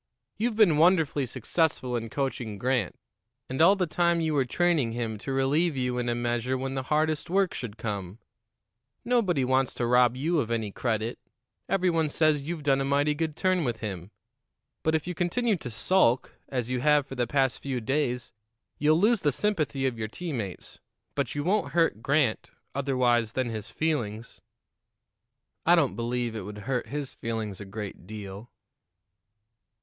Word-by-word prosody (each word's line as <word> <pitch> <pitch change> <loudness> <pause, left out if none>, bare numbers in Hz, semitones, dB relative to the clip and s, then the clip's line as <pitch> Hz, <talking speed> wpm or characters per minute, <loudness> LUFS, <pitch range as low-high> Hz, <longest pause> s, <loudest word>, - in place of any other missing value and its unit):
You've 230 0 0
been 185 -9 +5
wonderfully 160 -5 +3
successful 130 -2 0
in 115 -1 -3
coaching 120 -5 -3
Grant, 120 -4 0 0.5
and 130 +4 -2
all 190 +5 +7
the 190 -2 +1
time 170 +1 +2
you 160 -1 0
were 140 -3 +2
training 155 -4 +1
him 115 -3 -3
to 135 - -5
relieve 140 +4 +1
you 125 -1 -1
in 120 0 -1
a 120 - 0
measure 120 +2 -1
when 135 +1 -3
the 135 - -1
hardest 155 +1 +1
work 195 0 +2
should 115 -4 -6
come. 100 -3 -4 0.9
Nobody 200 - +2
wants 130 0 +1
to 120 - -1
rob 125 0 +4
you 160 +5 +1
of 115 -6 -1
any 110 -3 -1
credit; 110 +1 -2 0.5
every 185 -2 +2
one 160 -2 +1
says 150 -2 +2
you've 165 -3 -4
done 135 -1 +3
a - - +1
mighty 140 +2 +2
good 155 0 -2
turn 185 -1 +1
with 120 -4 -2
him. 95 -4 -5 0.7
But 160 0 +1
if 155 - -1
you 180 - -3
continue 205 +7 +1
to 135 - -6
sulk, 125 - +2 0.2
as 125 -4 -2
you 125 0 -1
have 150 0 +4
for 135 - -9
the 125 -2 -1
past 135 0 +1
few 135 -3 -2
days, 125 0 -1 0.5
you'll 155 +2 +4
lose 215 +2 +3
the 145 - +2
sympathy 150 - 0
of 125 -3 -1
your 110 - -2
teammates; 115 - -6 0.3
but - - -2
you 145 - -1
won't 200 +5 0
hurt 165 -10 +2
Grant 140 -4 +1 0.2
otherwise 125 -4 +1
than 130 -2 -1
his 110 +1 -5
feelings." 115 -6 -2 1.2
"I 175 - +6
don't 155 -6 +2
believe 120 -1 -2
it 110 - -3
would 105 +2 -8
hurt 130 -2 -1
his 145 -1 -4
feelings 110 -4 -4
a - - -6
great 100 -3 -7
deal." 105 +1 -8
135 Hz, 175 wpm, -27 LUFS, 115-160 Hz, 1.2 s, all